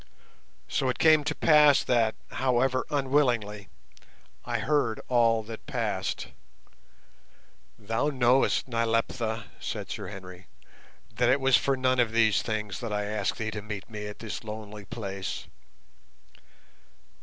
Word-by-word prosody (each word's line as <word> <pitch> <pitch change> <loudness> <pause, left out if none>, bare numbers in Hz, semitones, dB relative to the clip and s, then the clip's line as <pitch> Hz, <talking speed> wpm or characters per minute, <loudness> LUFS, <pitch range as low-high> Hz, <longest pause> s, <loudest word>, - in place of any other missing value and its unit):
So 130 - 0
it 125 - -1
came 155 -2 +5
to - - -1
pass 150 -3 +5
that, 115 -3 +2 0.2
however 130 0 +1
unwillingly, 125 -8 0 0.7
I - - -2
heard 135 -6 0
all 115 -2 +3
that 110 +1 -9
passed. - - -2 1.5
"Thou 115 +6 -1
knowest, 130 -1 +2
Nyleptha," 115 -1 -1 0.2
said - - -5
Sir - - -5
Henry, 90 -1 -10 0.7
"that 120 0 +2
it 130 +3 +4
was 135 -1 +4
for 135 +5 +2
none 130 0 +1
of 115 -2 +2
these 110 -3 +4
things 105 -4 -3
that 115 -3 -5
I 105 0 -1
asked 105 -1 -2
thee 110 -1 -3
to 105 0 -5
meet 105 +1 -7
me 105 -1 -5
at 105 - -8
this 115 0 -6
lonely 105 -1 -8
place. 95 -4 -5
115 Hz, 130 wpm, -28 LUFS, 105-130 Hz, 1.5 s, came